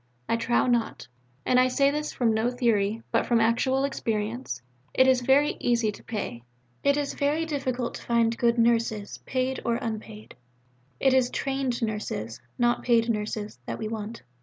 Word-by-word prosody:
I - - +2
trow 230 +1 +1
not; 235 - 0 0.4
and 250 - +4
I 255 - +5
say 275 +2 +3
this 300 +1 -2
from 235 -3 +1
no 220 +2 +1
theory, 230 -3 0
but - - +1
from 235 -1 +3
actual 245 +4 +2
experience. 225 - -2 0.4
It 260 - +6
is 260 -1 +4
very 270 +4 +3
easy 235 -3 +1
to - - -14
pay. 205 - -4 0.4
It 280 0 +3
is 290 -1 -1
very 295 +3 0
difficult 260 -5 -2
to - - -7
find 235 -1 +2
good 235 0 +2
Nurses, 230 -3 +1
paid 260 0 -1
or 235 - +1
unpaid. 220 -2 -6 0.7
It 265 -1 +3
is 260 -2 +3
trained 270 -3 -2
Nurses, 210 - -3 0.2
not 240 -1 +2
paid 235 -1 +3
nurses, 210 - -4
that - - -3
we 220 - -4
want. 220 +1 -6
235 Hz, 170 wpm, -26 LUFS, 220-260 Hz, 0.7 s, It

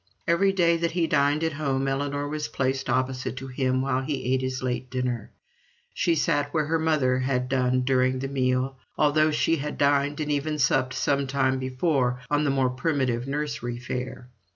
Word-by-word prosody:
Every 180 +3 +3
day 170 -3 +3
that 170 0 -1
he 170 -1 +1
dined 145 0 +2
at 160 -1 0
home 135 -2 -1
Ellinor 145 +1 -1
was 150 +1 -3
placed 130 0 -2
opposite 130 0 -1
to 135 - -5
him 130 0 0
while 130 -1 0
he 130 -2 -2
ate 130 - +1
his 130 0 -3
late 125 0 -2
dinner; 125 -3 -2 0.6
she 170 - +1
sat 145 -1 +1
where 155 -1 +1
her 160 +2 0
mother 145 -6 +2
had 125 -1 0
done 130 -1 +1
during 130 0 +2
the 135 +1 -3
meal, 130 0 0 0.2
although 155 +1 +3
she 160 +2 +1
had 150 +1 -4
dined 145 +1 +2
and 150 -1 -1
even 150 +1 -1
supped 130 -2 +2
some 140 -1 +1
time 130 -1 +1
before 130 -1 0
on 150 +1 +2
the - - +2
more 135 -2 +2
primitive 125 -2 -1
nursery 140 -4 -3
fare. 125 0 -5
135 Hz, 185 wpm, -26 LUFS, 130-150 Hz, 0.6 s, Every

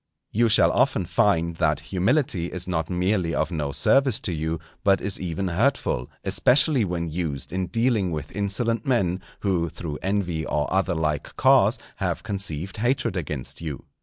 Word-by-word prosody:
_ - - -57 0.3
You 115 +2 +3
shall 110 - +5
often 125 -7 +2
find 85 -3 +1
that 75 -2 +1
humility 100 - +1
is 90 0 -3
not 80 -3 -1
merely 90 -1 0
of - - 0
no 75 -4 -2
service 130 - +3
to 95 - -3
you, 80 +1 -2 0.2
but 100 -1 +4
is 100 0 -2
even 90 +1 -2
hurtful, 105 - 0
especially 135 -1 +4
when 85 -3 -2
used 80 -3 -4
in 95 -1 -1
dealing 115 -4 +1
with 75 -1 -5
insolent 105 +3 0
men, 95 -8 +1 0.2
who, 90 -4 0
through 75 -2 -6
envy 95 -5 -1
or 75 -1 -1
other 95 -2 +1
like 75 -2 -2
cause, - - +4 0.2
have - - -2
conceived 95 -5 -3
hatred 125 -1 0
against 75 -6 -4
you. 75 -5 -6
90 Hz, 165 wpm, -24 LUFS, 80-105 Hz, 0.3 s, shall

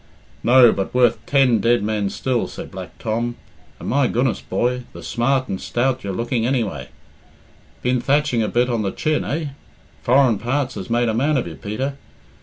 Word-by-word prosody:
"No, 120 -1 +7
but 100 +4 -3
worth 120 -3 +3
ten 135 -5 +4
dead 115 +1 +2
men 105 -2 -1
still," 125 +3 -1
said - - -9
Black - - -9
Tom. 115 +2 -2 0.4
"And - - -7
my 140 +1 +2
goodness, 120 0 0
boy, 125 +1 -1
the - - -10
smart 130 +2 0
and 95 - -4
stout 130 +1 -1
you're 100 - -3
looking, 115 +3 -1
anyway. 110 - -1 0.9
Been 125 0 +1
thatching 140 -3 +2
a 110 - +1
bit 120 +2 +1
on 120 -3 0
the 100 - -1
chin, 155 +8 -1
eh? 155 0 -2 0.5
Foreign 125 -4 +3
parts 130 +4 -1
has - - -7
made 120 +1 +2
a 110 - +1
man 140 +6 +2
of 125 - -1
you, 85 - -6
Peter. 110 - -4
120 Hz, 185 wpm, -21 LUFS, 110-130 Hz, 0.9 s, No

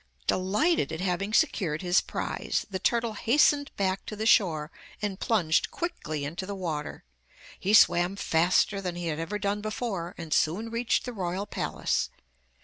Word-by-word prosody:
Delighted 210 - +1
at 160 - -4
having 190 +2 -1
secured 165 -6 +1
his 180 +1 +4
prize, - - -3
the 190 - -2
turtle 235 +3 +1
hastened 285 +5 +3
back 190 -1 0
to 215 - -5
the 215 +1 -3
shore 160 -8 +3 0.3
and 205 -2 -3
plunged 170 -8 +2
quickly 155 - -4
into 170 +6 -5
the 200 - -4
water. 160 -6 -4 0.6
He 205 +3 +3
swam 175 -2 +5
faster 185 +2 +2
than 180 -2 -3
he 175 0 -5
had 155 0 -3
ever 165 +6 -3
done 205 0 -1
before, 210 -5 -4
and 160 -2 -4
soon 205 +9 +1
reached 235 +1 0
the 250 - -5
royal 185 -1 -3
palace. - - -1
190 Hz, 160 wpm, -28 LUFS, 170-215 Hz, 0.6 s, swam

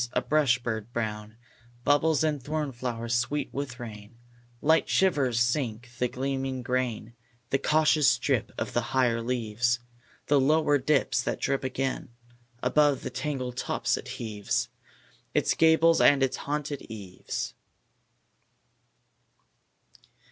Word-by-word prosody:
A - - +2
brush 145 -5 +3
bird 115 -2 -4
brown 110 -1 -4 0.5
Bubbles 150 +2 +3
in 155 -2 +1
thorn 150 +2 -3
flowers 120 -1 -4
sweet 125 +5 -1
with 135 -3 -4
rain; 110 -1 -9 0.4
Light 160 +4 +3
shivers 140 -11 +2
sink 120 -1 -1
the 125 - +2
gleaming 135 0 -3
grain; 120 -3 -2 0.4
The 135 - +2
cautious 155 0 +4
drip - - 0
of - - -3
higher 120 -1 +1
leaves 120 0 0 0.5
The 145 -1 +4
lower 145 +1 +3
dips 135 -2 +2
that - - -3
drip 135 0 0
again. 130 0 -2 0.5
Above 145 +2 +3
the - - -4
tangled 130 -5 -3
tops - - 0
it - - -7
heaves 105 -3 -2 0.7
Its - - +3
gables 165 +1 +4
and 140 -1 +6
its 135 - 0
haunted 145 0 -3
eaves. 100 -5 -5
130 Hz, 120 wpm, -27 LUFS, 120-145 Hz, 0.7 s, and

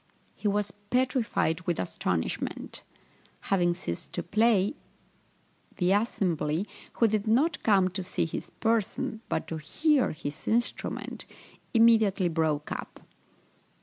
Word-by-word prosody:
He 215 - -3
was 205 -1 0 0.2
petrified 250 -9 +1
with 175 - 0
astonishment. 90 -2 -2 0.7
Having 175 -2 +3
ceased 85 - -5
to - - -2
play, 215 -1 +3 1.0
the 180 0 +2
assembly, 185 -5 +1 0.3
who 230 - +3
did 215 0 0
not 270 +10 +2
come 195 -4 +4
to 190 +1 -4
see 180 - -1
his 160 - -5
person, 225 -1 -1
but - - -1
to 160 - -3
hear 290 - +2
his 155 -1 -6
instrument, 235 +2 -1 0.5
immediately 220 -5 +5
broke 155 -2 0
up. - - -6
200 Hz, 115 wpm, -28 LUFS, 165-225 Hz, 1.0 s, immediately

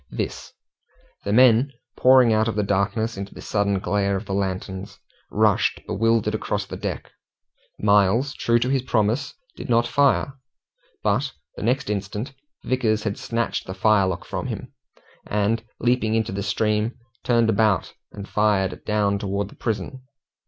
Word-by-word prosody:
This - - -5 0.7
the 100 - -1
men 125 +3 +5 0.2
pouring 130 -3 +6
out 110 +1 +2
of 115 - -2
the 105 - +1
darkness 100 +3 0
into 100 0 -7
the - - -10
sudden 100 -1 0
glare 100 +1 0
of 95 +3 -4
the 100 - -4
lanterns, 95 0 -3 0.3
rushed, - - +2
bewildered, 115 0 +1
across 110 - -2
the - - -7
deck. - - -5 0.7
Miles, 105 +7 +3
true 120 0 +2
to 120 +2 0
his 135 -1 +2
promise, 120 +3 0 0.2
did - - -8
not 120 0 +3
fire, 140 +1 +2 0.7
but - - +1 0.2
the - - -8
next 125 +6 0
instant 105 +5 -3 0.3
Vickers 110 -4 0
had 105 -2 -2
snatched 115 0 -2
the 95 - -5
firelock 95 -3 +2
from - - -4
him, - - -6 0.5
and 105 +2 0 0.2
leaping 120 -3 +1
into 110 -3 0
the 100 +1 -3
stream, 105 +2 0 0.3
turned 115 -2 +3
about 105 -1 +1 0.2
and 100 0 -8
fired 105 -3 +1
down 105 -2 +1
towards 100 -1 -2
the - - -15
prison. 110 +3 -3
105 Hz, 150 wpm, -23 LUFS, 100-115 Hz, 0.7 s, pouring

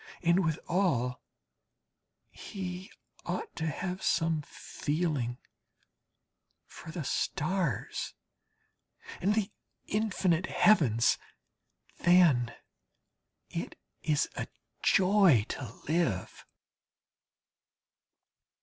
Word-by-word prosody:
And 170 +2 +4
withal 160 -7 0 1.1
he 185 0 -6 0.3
ought 445 - -4
to 160 - -2
have 180 +5 -3
some 165 -1 +1
feeling 145 -5 -2 1.3
for - - -12
the 160 0 -4
stars 155 - -1 1.1
and 200 +4 +2
the 215 -1 0 0.3
infinite 185 -4 +1
heavens. 125 - +4 0.8
Then 170 -10 +5 1.0
it - - -5 0.2
is 150 -2 +1
a - - -3 0.3
joy 185 - +5
to 125 -6 -5 0.2
live! 155 - -1
170 Hz, 70 wpm, -30 LUFS, 140-185 Hz, 1.3 s, Then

